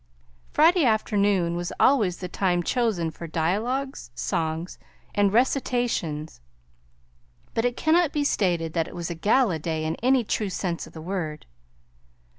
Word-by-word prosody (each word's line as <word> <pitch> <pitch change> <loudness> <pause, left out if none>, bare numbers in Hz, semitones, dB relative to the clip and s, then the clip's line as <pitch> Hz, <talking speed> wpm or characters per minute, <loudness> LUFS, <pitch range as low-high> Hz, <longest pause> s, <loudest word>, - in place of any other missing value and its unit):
Friday 335 +2 +5
afternoon 205 -6 +2
was 175 0 -3
always 215 -10 +3
the 180 - -5
time 180 -1 0
chosen 210 -8 0
for 170 +2 -8
dialogues, 220 - -2
songs, 165 +2 -2 0.3
and 205 -1 +3
recitations, 235 - 0 1.1
but 225 - 0
it 245 0 0
cannot 325 0 +3
be 295 -1 0
stated 175 - 0
that 165 -2 0
it - - -10
was 170 0 -4
a - - -4
gala 205 0 +2
day 160 0 -2
in 160 - 0
any 255 +1 +3
true 210 -1 -1
sense 180 -2 -3
of - - -16
the 160 - -8
word. 165 -4 -4
190 Hz, 145 wpm, -25 LUFS, 165-245 Hz, 1.1 s, Friday